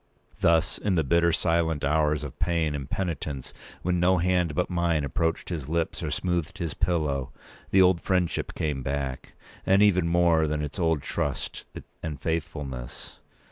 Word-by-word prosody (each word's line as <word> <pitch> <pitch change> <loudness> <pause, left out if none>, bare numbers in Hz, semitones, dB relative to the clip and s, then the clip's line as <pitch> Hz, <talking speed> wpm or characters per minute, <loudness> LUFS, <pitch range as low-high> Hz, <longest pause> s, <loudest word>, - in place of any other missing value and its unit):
Thus, 85 0 +3
in 100 -3 0
the 80 - +2
bitter 85 +4 +3
silent 80 -2 +1
hours 75 +1 +2
of 75 0 -8
pain 85 -3 +1
and 70 -2 -5
penitence, 80 -7 -3 0.3
when 90 0 +1
no 90 +1 +4
hand 90 -3 +1
but 90 - +1
mine 85 -4 +1
approached 80 +4 -1
his 75 -6 -4
lips 85 +1 -1
or 80 - -2
smoothed 85 +3 -2
his 85 -5 -3
pillow, 70 -6 0 0.4
the 95 -1 +6
old 90 -2 +4
friendship 90 -3 0
came 75 -4 -2
back 65 -1 -4 0.3
with 95 +1 +4
even 90 -4 +4
more 85 -2 +3
than 75 0 -1
its 75 +3 -5
old 80 -4 +1
trust 70 -3 -3 0.4
and 75 -4 -5
faithfulness. 75 -7 -4
80 Hz, 160 wpm, -27 LUFS, 75-85 Hz, 0.4 s, the